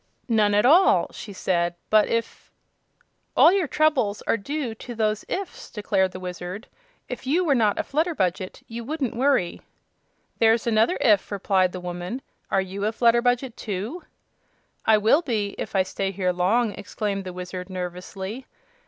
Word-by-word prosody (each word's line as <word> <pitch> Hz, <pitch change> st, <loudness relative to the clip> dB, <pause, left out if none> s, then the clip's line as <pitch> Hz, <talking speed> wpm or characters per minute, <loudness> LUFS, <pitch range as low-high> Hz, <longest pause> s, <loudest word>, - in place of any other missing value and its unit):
"None 210 Hz, -3 st, +3 dB
at 210 Hz, -, +4 dB
all," 345 Hz, +9 st, +5 dB
she 210 Hz, -, -9 dB
said; 175 Hz, -3 st, 0 dB, 0.2 s
"but 215 Hz, -1 st, +5 dB
if 230 Hz, 0 st, -3 dB, 0.4 s
" -, -, -30 dB
"All 335 Hz, -, +8 dB
your 385 Hz, -5 st, +1 dB
troubles 275 Hz, -10 st, +1 dB
are -, -, +2 dB
due 260 Hz, +3 st, -3 dB
to 240 Hz, +2 st, -9 dB
those 215 Hz, -1 st, 0 dB
'ifs'," 435 Hz, +6 st, -5 dB
declared 190 Hz, -3 st, 0 dB
the 185 Hz, -, -8 dB
Wizard. 180 Hz, +4 st, -6 dB, 0.4 s
"If 250 Hz, +1 st, -7 dB
you 345 Hz, +7 st, +2 dB
were 295 Hz, -, +3 dB
not 220 Hz, -5 st, +2 dB
a -, -, 0 dB
Flutterbudget 275 Hz, -, -1 dB
you 230 Hz, +1 st, -7 dB
wouldn't 270 Hz, -2 st, -3 dB
worry." 255 Hz, -8 st, +1 dB, 0.8 s
"There's 225 Hz, 0 st, +4 dB
another 225 Hz, +7 st, +3 dB
'if'," 210 Hz, -4 st, +3 dB
replied 190 Hz, -2 st, +2 dB
the 185 Hz, -, -6 dB
woman. 180 Hz, +8 st, -5 dB, 0.3 s
"Are 195 Hz, -, +2 dB
you 190 Hz, +1 st, -5 dB
a -, -, +1 dB
Flutterbudget, 240 Hz, +2 st, +2 dB
too?" 215 Hz, -, -4 dB, 0.9 s
"I 220 Hz, -1 st, +6 dB
will 220 Hz, +9 st, +4 dB
be, 215 Hz, -10 st, -2 dB
if -, -, -5 dB
I 190 Hz, -, +4 dB
stay 195 Hz, +1 st, -3 dB
here 185 Hz, -1 st, -1 dB
long," 210 Hz, +6 st, +2 dB
exclaimed 205 Hz, -1 st, -4 dB
the 185 Hz, -, -6 dB
Wizard, 180 Hz, +1 st, -6 dB
nervously. 190 Hz, +6 st, -6 dB
215 Hz, 160 wpm, -24 LUFS, 190-245 Hz, 0.9 s, All